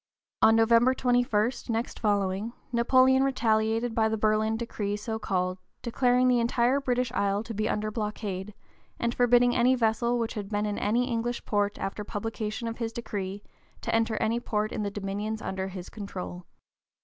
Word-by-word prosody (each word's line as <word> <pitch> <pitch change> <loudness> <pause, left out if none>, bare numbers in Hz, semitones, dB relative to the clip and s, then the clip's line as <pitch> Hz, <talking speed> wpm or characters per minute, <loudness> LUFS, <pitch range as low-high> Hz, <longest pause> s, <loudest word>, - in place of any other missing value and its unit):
On 225 - +6
November 230 +3 +4
21, 245 -3 +2 0.2
next 230 +1 -2
following, 205 +1 0 0.2
Napoleon 255 +2 +4
retaliated 225 -3 +1
by 220 -1 +2
the 220 - -1
Berlin 215 +1 +1
decree, 210 -3 -3
so 220 +1 -4
called, 185 -2 -1 0.2
declaring 250 +1 +2
the 250 -1 +4
entire 240 +3 +2
British 250 -2 0
Isles 200 +2 0
to 230 - -6
be 215 +1 -1
under 215 0 -1
blockade, 210 -2 -4 0.4
and 235 0 -1
forbidding 245 0 +4
any 255 +2 +4
vessel 235 0 +1
which 230 -1 -2
had 205 -2 -5
been 210 0 -1
in 210 -1 -2
any 240 +4 +1
English 240 0 -2
port 205 -1 0
after 195 +2 -4
publication 220 +2 -4
of 230 +1 -5
his 230 -1 -2
decree 205 -4 -5 0.4
to - - -3
enter 225 0 +2
any 225 +2 +1
port 215 -2 -1
in - - -3
the 205 - -1
dominions 205 +2 -3
under 190 -2 -3
his 185 -2 -7
control. 185 -4 -7
220 Hz, 170 wpm, -28 LUFS, 205-235 Hz, 0.4 s, On